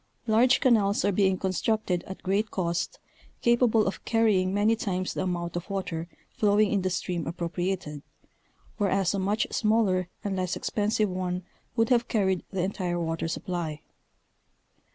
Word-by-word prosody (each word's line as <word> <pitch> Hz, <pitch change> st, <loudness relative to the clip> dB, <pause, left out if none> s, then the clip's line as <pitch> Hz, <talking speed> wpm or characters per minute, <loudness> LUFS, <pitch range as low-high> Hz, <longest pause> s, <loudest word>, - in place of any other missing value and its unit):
Large 235 Hz, +4 st, +4 dB
canals 215 Hz, -6 st, +3 dB
are 205 Hz, -, +3 dB
being 190 Hz, -1 st, +2 dB
constructed. 190 Hz, -1 st, 0 dB
at 190 Hz, -, -8 dB
great 200 Hz, +3 st, +1 dB
cost, 170 Hz, -3 st, -2 dB, 0.5 s
capable 235 Hz, -2 st, +4 dB
of 195 Hz, -, -3 dB
carrying 210 Hz, -5 st, +2 dB
many 205 Hz, +3 st, +3 dB
times 185 Hz, -4 st, -2 dB
the -, -, -2 dB
amount 175 Hz, -2 st, -2 dB
of 175 Hz, +3 st, -4 dB
water 185 Hz, -4 st, -3 dB, 0.2 s
flowing 210 Hz, 0 st, +3 dB
in 200 Hz, -, +2 dB
the 185 Hz, -, 0 dB
stream 175 Hz, -4 st, -2 dB
appropriated, 170 Hz, -2 st, -3 dB, 0.8 s
whereas 195 Hz, -3 st, +1 dB
a 200 Hz, -, -1 dB
much 205 Hz, +4 st, +1 dB
smaller 205 Hz, -5 st, +2 dB
and 200 Hz, -2 st, -2 dB
less 185 Hz, -1 st, -1 dB
expensive 210 Hz, 0 st, 0 dB
one 180 Hz, 0 st, -2 dB, 0.3 s
would 225 Hz, -1 st, +2 dB
have 240 Hz, -2 st, +3 dB
carried 190 Hz, -5 st, +1 dB
the 190 Hz, -3 st, -2 dB
entire 180 Hz, -2 st, -2 dB
water 165 Hz, -1 st, -2 dB
supply. 165 Hz, -3 st, -3 dB
190 Hz, 150 wpm, -27 LUFS, 180-215 Hz, 0.8 s, Large